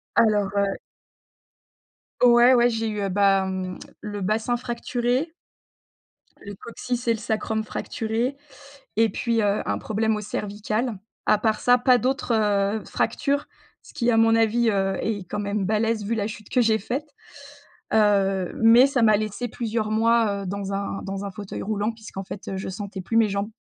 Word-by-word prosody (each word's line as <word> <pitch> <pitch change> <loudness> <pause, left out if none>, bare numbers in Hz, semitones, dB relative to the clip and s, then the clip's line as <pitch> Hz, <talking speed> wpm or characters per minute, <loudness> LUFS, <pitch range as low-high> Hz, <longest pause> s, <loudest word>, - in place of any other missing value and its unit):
alors, 210 -3 +3
heu 200 -1 +1 1.5
Ouais, 240 +1 +7
ouais, 240 0 +4
j'ai 225 -1 -2
eu, 205 -2 -2
bah, 195 0 +3
mmh, 185 -1 -4 0.2
le 205 -1 -5
bassin 220 +5 0
fracturé 245 +4 -2 1.1
le 200 -1 -8
coccyx 240 +3 -5
et 230 - +4
le 220 - -5
sacrum 220 0 -2
fracturé 235 +3 -3 0.6
et 225 0 +3
puis, 230 +2 0
heu, 205 0 +1
un 100 0 0
problème 220 - 0
aux 210 - -4
cervicales. 210 +2 -3 0.3
À 215 - +4
part 215 0 0
ça 245 0 +4
pas 250 0 +4
d'autres, 255 -1 -1
heu, 210 -1 +1
fractures. 285 0 -1 0.4
Ce - - -16
qui 240 -3 +1
à 225 - +2
mon 225 0 +5
avis, 225 +1 +3
heu, 195 -1 0
est 205 -4 -2
quand 210 - -3
même 200 -1 -1
balèze 220 +1 0
vu 230 +2 -1
la 210 -1 -1
chute 215 -1 -9
que 250 - +2
j'ai 220 -1 +3
faite, 270 +9 -4 0.9
heu, 195 -4 +2
mais 235 +4 +8
ça 270 -3 0
m'a 215 -2 +5
laissé 215 +3 -3
plusieurs 220 -2 -2
mois, 220 -2 +2
heu, - - -7
dans 200 0 -4
un 195 0 -3
dans 195 0 -5
un 200 - -5
fauteuil 200 +1 -7
roulant 210 +1 -1
puisqu'en 215 -3 -8
fait, 190 - -8
heu, 190 - -3
je 190 - -5
sentais 195 0 -6
plus 225 +6 -1
mes 220 -2 +4
jambes. 200 +2 -2
215 Hz, 175 wpm, -24 LUFS, 200-235 Hz, 1.5 s, mais